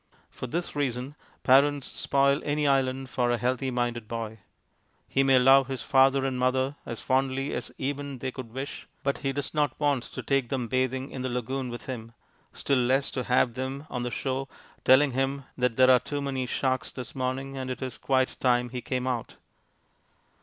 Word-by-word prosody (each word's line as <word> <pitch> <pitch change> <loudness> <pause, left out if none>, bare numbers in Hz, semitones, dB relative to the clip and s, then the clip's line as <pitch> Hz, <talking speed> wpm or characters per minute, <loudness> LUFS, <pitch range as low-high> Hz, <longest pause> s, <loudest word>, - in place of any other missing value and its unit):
For 130 - -6
this 170 +6 -3
reason 130 -1 -2 0.3
parents 140 +1 +4
spoil 140 +1 +1
any 150 0 0
island 135 -1 +1
for 120 -1 +1
a 120 - +2
healthy 130 +2 0
minded 120 -2 -2
boy. 110 -1 -5 0.7
He 135 - +2
may 135 -1 +5
love 135 +1 +6
his 135 -3 -4
father 135 0 +4
and 130 -2 -1
mother 130 +2 +1
as 115 - -5
fondly 135 +1 0
as - - -4
even 140 0 -3
they 130 +1 -3
could 125 -3 -8
wish, 135 +4 -6 0.2
but 140 0 0
he 135 - -1
does 140 +1 -4
not 150 -4 0
want 145 -4 +2
to - - -7
take 135 -4 +1
them 130 -3 -1
bathing 130 +1 -1
in 130 - -5
the 130 - -2
lagoon 125 +2 -2
with 120 0 -7
him 115 -3 -6 0.4
still 140 -2 +1
less 130 +3 +2
to 125 - -3
have 125 -1 +3
them 130 +3 -4
on 125 - -2
the 125 - -2
shore, 135 +2 -2 0.4
telling 135 +2 +6
him 135 +2 -1
that 125 -2 +1
there 130 +1 +6
are 125 - +7
too 145 +2 -4
many 135 -2 -2
sharks 130 0 -1
this 125 -3 -7
morning 135 +1 -3
and 130 -1 -4
that 130 +1 -4
it - - 0
is 130 - -7
quite 130 -1 +1
time 125 -1 +2
he 125 0 -5
came 130 0 -2
out. 125 -3 -3
130 Hz, 195 wpm, -27 LUFS, 125-135 Hz, 0.7 s, are